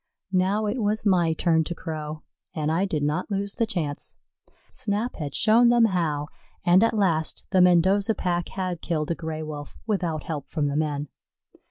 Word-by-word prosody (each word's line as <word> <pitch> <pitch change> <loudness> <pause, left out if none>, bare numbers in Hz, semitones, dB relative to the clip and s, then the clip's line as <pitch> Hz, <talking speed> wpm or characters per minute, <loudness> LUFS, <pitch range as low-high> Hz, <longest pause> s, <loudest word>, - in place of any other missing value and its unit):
Now 190 +4 +2
it 220 +4 -1
was 215 +1 0
my 175 -5 +3
turn 160 0 +2
to 175 - -4
crow, 155 -1 -6 0.3
and 155 -1 0
I 175 +5 +2
did 155 -6 -2
not 150 +7 -1
lose 200 0 -2
the 230 - 0
chance. 160 -10 -3 0.6
Snap 215 +4 -2
had 145 -4 -5
shown 235 +2 +5
them 240 -1 +5
how, 160 -7 0 0.4
and 175 +2 +6
at 230 - +2
last 165 -6 0
the 185 - +5
Mendoza 190 +4 +4
pack 175 -2 -1
had 185 -3 -3
killed 155 -2 -1
a - - 0
Gray 160 -1 -5
wolf 150 -1 -7
without 175 -8 -1
help 150 -4 -5
from 150 - -1
the 140 0 -1
men. 150 -1 -1
175 Hz, 180 wpm, -25 LUFS, 155-200 Hz, 0.6 s, and